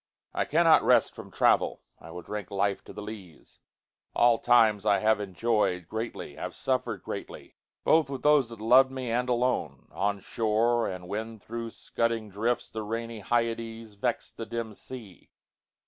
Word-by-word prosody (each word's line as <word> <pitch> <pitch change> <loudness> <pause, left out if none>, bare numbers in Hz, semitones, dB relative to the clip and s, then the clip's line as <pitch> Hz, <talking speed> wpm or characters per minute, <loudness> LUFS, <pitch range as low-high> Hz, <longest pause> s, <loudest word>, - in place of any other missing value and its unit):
I - - 0
cannot - - +5
rest - - +4
from - - -10
travel: - - +2 0.2
I - - -12
will 90 +1 -8
drinkLife 100 0 -2
to - - -10
the 105 - -8
lees: 100 -7 -11 0.6
all 120 -1 +5
times 110 -4 +4
I 105 -2 +4
have 110 0 +2
enjoy'dGreatly, 105 -3 -2
have - - -5
suffer'd 125 -7 -1
greatly, - - -7 0.3
both 160 -4 +4
with 135 -2 -5
thoseThat 130 -7 +3
lov'd 130 +4 +6
me, 130 -3 -4
and 125 +2 0
alone; 125 +1 -1
on 100 0 -1
shore, 115 +3 +1
and 90 -1 -6
whenThro' 110 +3 -5
scudding 115 -2 -2
drifts 115 +5 -1
the 110 - -4
rainy 115 +1 -4
HyadesVex'd 115 0 -2
the 115 - -5
dim 115 0 -4
sea. 110 -4 -11
115 Hz, 145 wpm, -28 LUFS, 105-120 Hz, 0.6 s, lov'd